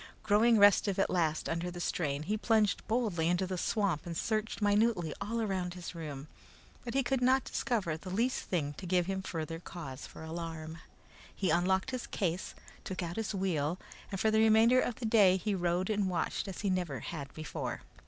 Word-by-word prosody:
Growing 225 Hz, +2 st, +4 dB
restive 200 Hz, -1 st, +5 dB
at 195 Hz, -, +1 dB
last 160 Hz, -3 st, +1 dB
under 170 Hz, +2 st, -2 dB
the 175 Hz, 0 st, -7 dB
strain, 150 Hz, -4 st, -1 dB
he 205 Hz, +7 st, -1 dB
plunged 215 Hz, -1 st, +2 dB
boldly 215 Hz, -8 st, +1 dB
into 180 Hz, +2 st, +2 dB
the 185 Hz, 0 st, -3 dB
swamp 185 Hz, -4 st, 0 dB
and 170 Hz, -1 st, -4 dB
searched 220 Hz, +2 st, -1 dB
minutely 205 Hz, -6 st, +2 dB
all 230 Hz, +3 st, -2 dB
around 185 Hz, -5 st, -2 dB
his 180 Hz, -1 st, -7 dB
room, 150 Hz, -4 st, -6 dB, 0.6 s
but 240 Hz, +1 st, -5 dB
he 270 Hz, -, +3 dB
could 260 Hz, +1 st, 0 dB
not 260 Hz, +1 st, +4 dB
discover 200 Hz, -10 st, -1 dB
the 180 Hz, +4 st, -8 dB
least 235 Hz, +7 st, 0 dB
thing 150 Hz, -5 st, -1 dB
to 180 Hz, +5 st, -8 dB
give 180 Hz, 0 st, +2 dB
him 190 Hz, +1 st, -2 dB
further 165 Hz, -2 st, -4 dB
cause 145 Hz, -6 st, -8 dB
for -, -, -11 dB
alarm. 160 Hz, 0 st, -6 dB, 0.6 s
He 185 Hz, -5 st, 0 dB
unlocked 190 Hz, +7 st, +2 dB
his 255 Hz, -2 st, -4 dB
case, 180 Hz, -3 st, -2 dB, 0.3 s
took 185 Hz, -1 st, -4 dB
out 170 Hz, 0 st, -4 dB
his 220 Hz, -2 st, -2 dB
wheel, 175 Hz, -4 st, 0 dB, 0.3 s
and 195 Hz, -, -3 dB
for 220 Hz, -, +3 dB
the 220 Hz, -, +3 dB
remainder 225 Hz, +3 st, +6 dB
of 245 Hz, -, -1 dB
the 240 Hz, -, -6 dB
day 205 Hz, -4 st, +5 dB
he 205 Hz, +3 st, -1 dB
rode 180 Hz, 0 st, 0 dB
and 205 Hz, -2 st, +1 dB
watched 180 Hz, -, -1 dB
as 190 Hz, -, -6 dB
he 200 Hz, -2 st, +1 dB
never 170 Hz, -9 st, -2 dB
had 145 Hz, -5 st, -6 dB
before. 155 Hz, -1 st, -4 dB
185 Hz, 195 wpm, -32 LUFS, 165-215 Hz, 0.6 s, remainder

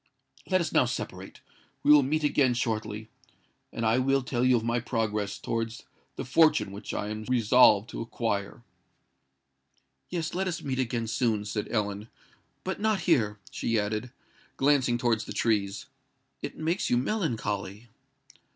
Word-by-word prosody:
Let 185 Hz, -1 st, +3 dB
us 170 Hz, -, -2 dB
now -, -, +4 dB
separate; 95 Hz, -6 st, -6 dB, 0.4 s
we -, -, +5 dB
will 150 Hz, -1 st, +8 dB
meet 150 Hz, +3 st, 0 dB
again 135 Hz, -4 st, +3 dB
shortly—and 110 Hz, 0 st, -5 dB
I 110 Hz, +3 st, +3 dB
will 135 Hz, +1 st, +2 dB
tell 125 Hz, -1 st, -1 dB
you 130 Hz, 0 st, +5 dB
of 110 Hz, -, -3 dB
my 115 Hz, +1 st, 0 dB
progress 105 Hz, -4 st, -2 dB
towards 115 Hz, 0 st, -3 dB, 0.3 s
the -, -, -5 dB
fortune 130 Hz, -7 st, +3 dB
which 100 Hz, +1 st, -7 dB
I 105 Hz, -, -3 dB
am 110 Hz, 0 st, -5 dB
resolved 115 Hz, -3 st, +5 dB
to -, -, -5 dB
acquire." 115 Hz, -2 st, -3 dB, 1.5 s
"Yes—let 175 Hz, +2 st, -2 dB
us 170 Hz, -2 st, -3 dB
meet 130 Hz, -2 st, -2 dB
again 120 Hz, -2 st, -1 dB
soon," 110 Hz, -2 st, 0 dB
said 105 Hz, 0 st, -3 dB
Ellen; 105 Hz, 0 st, -2 dB, 0.5 s
"but 190 Hz, -, -3 dB
not 215 Hz, -2 st, +1 dB
here," 115 Hz, -, +2 dB
she 115 Hz, -1 st, 0 dB
added, 105 Hz, +3 st, -2 dB, 0.5 s
glancing 135 Hz, -4 st, +3 dB
towards 115 Hz, -2 st, 0 dB
the -, -, -6 dB
trees. 105 Hz, -4 st, 0 dB, 0.6 s
"It -, -, -6 dB
makes 165 Hz, +4 st, -1 dB
you 120 Hz, -, +3 dB
melancholy." 115 Hz, -, -2 dB
115 Hz, 145 wpm, -28 LUFS, 105-135 Hz, 1.5 s, will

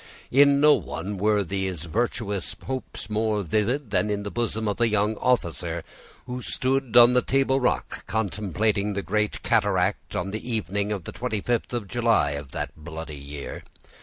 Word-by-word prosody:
In 140 Hz, +1 st, +6 dB
no 150 Hz, +1 st, +7 dB
one 85 Hz, -, -3 dB
were 105 Hz, 0 st, +3 dB
these 95 Hz, -3 st, -3 dB
virtuous 105 Hz, +1 st, -2 dB
hopes 130 Hz, -1 st, -5 dB
more 105 Hz, -1 st, 0 dB
vivid 110 Hz, -, 0 dB
than 105 Hz, -, +2 dB
in 100 Hz, -1 st, -1 dB
the 100 Hz, -, -5 dB
bosom 110 Hz, -2 st, -1 dB
of 105 Hz, +3 st, -2 dB
a 120 Hz, -, +5 dB
young 105 Hz, 0 st, +1 dB
officer 85 Hz, -9 st, 0 dB, 0.4 s
who 125 Hz, 0 st, -5 dB
stood 130 Hz, 0 st, 0 dB
on 120 Hz, +1 st, +9 dB
the 125 Hz, -, +4 dB
table 135 Hz, 0 st, +2 dB
rock, 125 Hz, -, -1 dB
contemplating 105 Hz, 0 st, 0 dB
the 100 Hz, 0 st, -2 dB
great 105 Hz, 0 st, -1 dB
cataract, -, -, +1 dB
on 95 Hz, +2 st, -2 dB
the 110 Hz, -, -4 dB
evening 100 Hz, -1 st, -1 dB
of 100 Hz, -4 st, -3 dB
the -, -, -7 dB
25th 120 Hz, -1 st, -1 dB
of 120 Hz, -5 st, -3 dB
July 115 Hz, -10 st, +2 dB
of 70 Hz, -1 st, -5 dB
that -, -, -4 dB
bloody 80 Hz, -1 st, -7 dB
year. 70 Hz, 0 st, -7 dB
105 Hz, 165 wpm, -25 LUFS, 95-120 Hz, 0.4 s, on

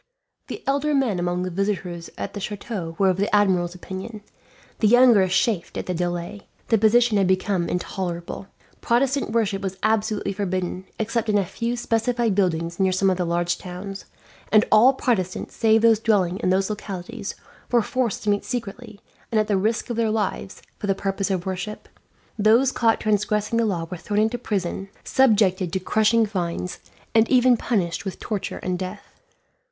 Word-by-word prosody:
The -, -, -7 dB
elder 285 Hz, +2 st, +1 dB
men 245 Hz, -9 st, +1 dB
among 175 Hz, +1 st, -1 dB
the 185 Hz, -, -3 dB
visitors 180 Hz, -3 st, -3 dB
at -, -, -5 dB
the 205 Hz, -, -5 dB
chateau 200 Hz, -4 st, -5 dB
were 195 Hz, -1 st, +4 dB
of 185 Hz, -, -3 dB
the 200 Hz, +2 st, 0 dB
admiral's 180 Hz, -4 st, +2 dB
opinion. 190 Hz, +4 st, -7 dB, 0.6 s
The 215 Hz, -, +3 dB
younger 240 Hz, -4 st, +6 dB
chafed 190 Hz, 0 st, 0 dB
at -, -, -3 dB
the 180 Hz, -, -2 dB
delay. 175 Hz, +3 st, -4 dB, 0.2 s
The 225 Hz, -, +4 dB
position 225 Hz, +1 st, +4 dB
had 195 Hz, -, +3 dB
indeed 185 Hz, 0 st, +3 dB
become 185 Hz, -2 st, -1 dB
intolerable. 180 Hz, 0 st, -4 dB, 0.3 s
Protestant 265 Hz, +3 st, +1 dB
worship 215 Hz, -3 st, 0 dB
was 190 Hz, -1 st, -4 dB
absolutely 215 Hz, -2 st, 0 dB
forbidden, 185 Hz, -2 st, -3 dB
except 225 Hz, +1 st, -1 dB
in 210 Hz, -, +3 dB
a 200 Hz, -, +1 dB
few 235 Hz, +6 st, -3 dB
specified 235 Hz, -1 st, 0 dB
buildings 170 Hz, -3 st, 0 dB
near 190 Hz, -1 st, +3 dB
some 190 Hz, +1 st, +2 dB
of 185 Hz, -, -1 dB
the 180 Hz, -, +1 dB
large 175 Hz, +1 st, 0 dB
towns; 190 Hz, +2 st, -7 dB, 0.5 s
and 215 Hz, 0 st, +5 dB
all 235 Hz, +5 st, +7 dB
Protestants, 190 Hz, -9 st, -2 dB
save 220 Hz, 0 st, +3 dB
those 225 Hz, -2 st, +5 dB
dwelling 195 Hz, -5 st, +1 dB
in 205 Hz, -, 0 dB
these 190 Hz, +2 st, +1 dB
localities, 205 Hz, +1 st, -6 dB, 0.4 s
were 240 Hz, -2 st, +4 dB
forced 250 Hz, -3 st, -1 dB
to 210 Hz, -, +2 dB
meet 205 Hz, -, 0 dB
secretly, 225 Hz, -2 st, -6 dB, 0.3 s
and 220 Hz, -, +2 dB
at 215 Hz, -, +2 dB
the 205 Hz, -, +1 dB
risk 220 Hz, +5 st, 0 dB
of 235 Hz, -, -3 dB
their 230 Hz, -1 st, +2 dB
lives, 210 Hz, -2 st, -3 dB, 0.2 s
for 205 Hz, -, -4 dB
the 195 Hz, -, +2 dB
purpose 195 Hz, 0 st, -2 dB
of 185 Hz, -3 st, -1 dB
worship. 190 Hz, +3 st, -5 dB, 0.5 s
Those 230 Hz, +6 st, +4 dB
caught 230 Hz, -3 st, +2 dB
transgressing 210 Hz, +1 st, 0 dB
the 230 Hz, -, +2 dB
law 175 Hz, -5 st, -1 dB
were 180 Hz, -, -4 dB
thrown 205 Hz, +5 st, -1 dB
into 225 Hz, +3 st, 0 dB
prison, 195 Hz, -3 st, -3 dB
subjected 200 Hz, -8 st, +3 dB
to 190 Hz, -, -1 dB
crushing 220 Hz, +4 st, +2 dB
fines, 180 Hz, -3 st, -3 dB, 0.3 s
and 225 Hz, 0 st, +4 dB
even 250 Hz, -1 st, +5 dB
punished 195 Hz, -6 st, -1 dB
with 195 Hz, -3 st, -6 dB
torture 210 Hz, -3 st, -4 dB
and 180 Hz, -1 st, -2 dB
death. 185 Hz, +2 st, -8 dB
205 Hz, 180 wpm, -23 LUFS, 185-225 Hz, 0.6 s, all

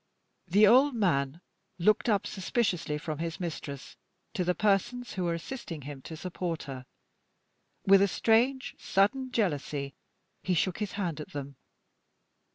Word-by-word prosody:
The 200 Hz, +5 st, +6 dB
old 260 Hz, +5 st, +6 dB
man 160 Hz, -7 st, +1 dB, 0.4 s
looked 210 Hz, +6 st, +3 dB
up 205 Hz, -3 st, +2 dB
suspiciously 180 Hz, -5 st, -1 dB
from 155 Hz, 0 st, -5 dB
his 165 Hz, 0 st, -3 dB
mistress 150 Hz, -5 st, -6 dB, 0.4 s
to 195 Hz, -5 st, 0 dB
the 180 Hz, 0 st, +1 dB
persons 240 Hz, +4 st, +1 dB
who 185 Hz, -2 st, -2 dB
were 170 Hz, -1 st, 0 dB
assisting 170 Hz, -, -6 dB
him 140 Hz, -1 st, -8 dB
to 160 Hz, +4 st, -8 dB
support 175 Hz, -1 st, -4 dB
her. 130 Hz, -2 st, -8 dB, 1.0 s
With 195 Hz, 0 st, +7 dB
a 200 Hz, -, +5 dB
strange, 240 Hz, +7 st, +2 dB
sudden 255 Hz, +7 st, +1 dB
jealousy 145 Hz, -, -1 dB, 0.5 s
he 185 Hz, -, 0 dB
shook 180 Hz, +2 st, 0 dB
his 210 Hz, -3 st, -3 dB
hand 175 Hz, -6 st, -2 dB
at -, -, -10 dB
them. 140 Hz, -1 st, -6 dB
180 Hz, 145 wpm, -29 LUFS, 155-215 Hz, 1.0 s, With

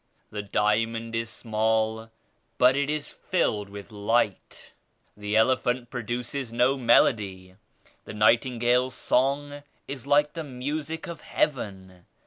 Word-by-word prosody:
The 105 Hz, -, -4 dB
diamond 115 Hz, +3 st, 0 dB
is 115 Hz, 0 st, -2 dB
small 110 Hz, 0 st, -1 dB, 0.5 s
but 125 Hz, +1 st, +5 dB
it 140 Hz, +1 st, 0 dB
is 150 Hz, -1 st, -3 dB
filled 105 Hz, -, -1 dB
with 100 Hz, +1 st, -10 dB
light. 105 Hz, -1 st, -1 dB, 0.4 s
The 105 Hz, +1 st, -3 dB
elephant 125 Hz, +1 st, +2 dB
produces 120 Hz, +1 st, -4 dB
no 125 Hz, +3 st, +3 dB
melody; 100 Hz, -7 st, +2 dB, 0.5 s
the -, -, -8 dB
nightin 115 Hz, +4 st, +3 dB
gale's 125 Hz, +2 st, +2 dB
song 145 Hz, +2 st, 0 dB, 0.3 s
is 135 Hz, -2 st, -7 dB
like 150 Hz, +1 st, +3 dB
the 165 Hz, -, -4 dB
music 150 Hz, +4 st, -4 dB
of 170 Hz, -3 st, -8 dB
Heaven. 95 Hz, -9 st, -3 dB
120 Hz, 120 wpm, -26 LUFS, 110-135 Hz, 0.5 s, but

